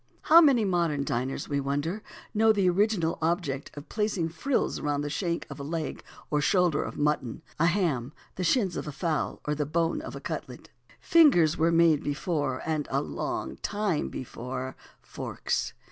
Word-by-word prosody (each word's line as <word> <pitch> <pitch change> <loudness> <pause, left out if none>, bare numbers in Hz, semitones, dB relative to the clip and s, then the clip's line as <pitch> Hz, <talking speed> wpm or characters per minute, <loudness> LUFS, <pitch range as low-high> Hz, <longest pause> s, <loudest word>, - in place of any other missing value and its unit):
How 330 +2 +8
many 265 -9 +5
modern 170 -6 +1
diners, 130 +2 -2
we 140 -1 0
wonder, 145 +9 -2 0.3
know 220 +1 +5
the 200 -3 +2
original 180 -2 +1
object 160 -5 -1
of 145 - -8
placing 210 -6 -1
frills 240 - -1
around 145 -1 -1
the 145 0 -3
shank 170 +1 -2
of - - -9
a - - -5
leg 155 +1 -4 0.3
or 150 -1 +2
shoulder 180 -3 +3
of - - -5
mutton, 150 -2 -1 0.2
a 165 - +4
ham, 160 -9 0 0.2
the 185 - -4
shins 195 0 +2
of - - -4
a - - -3
fowl, 160 +1 -2
or 150 - 0
the 150 -1 -2
bone 165 +2 0
of - - -7
a - - -6
cutlet? - - -6 0.3
Fingers 260 - +5
were 165 +1 +2
made 165 -3 +4
before 145 +1 -2
and 155 -2 -1
a - - +1
long 65 - -4
time 205 -6 -1
before 130 +1 -6 0.3
forks. - - -3
165 Hz, 175 wpm, -28 LUFS, 145-185 Hz, 0.3 s, How